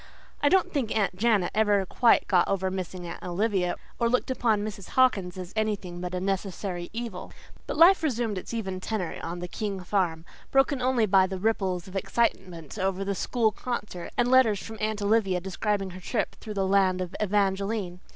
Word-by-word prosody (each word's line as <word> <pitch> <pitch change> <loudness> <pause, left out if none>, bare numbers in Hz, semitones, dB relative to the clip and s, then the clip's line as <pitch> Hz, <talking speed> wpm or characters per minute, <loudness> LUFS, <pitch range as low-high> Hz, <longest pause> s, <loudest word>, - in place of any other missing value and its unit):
I 290 - +4
don't 380 +2 +3
think 250 -7 0
Aunt 200 -3 +1
Janet 210 -3 +2
ever 205 -2 +3
quite 235 +5 +3
got 180 -3 +3
over 190 -1 0
missing 185 -1 -5
Aunt 170 - -7
Olivia, 185 0 0 0.2
or 235 -1 +2
looked 250 +2 +1
upon 225 -5 +1
Mrs. 200 -3 -7
Hawkins 195 -9 +3
as 180 -1 -7
anything 200 -5 -2
but 180 0 -4
a - - -1
necessary 190 -2 -3
evil; 225 -4 -6 0.4
but - - -3
life 360 +4 +7
resumed 235 - -1
its - - -9
even 195 -5 -3
tenor 185 -3 -3
on 175 +1 -5
the 180 - -4
King 200 +1 -4
farm, 175 -4 -1 0.2
broken 270 0 +2
only 250 -3 +2
by 190 -2 +4
the 190 0 -4
ripples 190 -3 -1
of 190 - -11
excitement 190 - -1
over 190 0 -1
the 200 - 0
school 225 +3 +1
concert 210 -6 -5
and 245 0 +2
letters 240 -6 +5
from 220 +2 -8
Aunt 215 -1 -1
Olivia 200 -3 +2
describing 195 +1 -2
her 185 - -9
trip 210 +5 -2
through 215 -2 -8
the 195 -1 +1
land 190 -1 +3
of 180 -1 -4
Evangeline. 195 -2 0
200 Hz, 190 wpm, -27 LUFS, 185-225 Hz, 0.4 s, life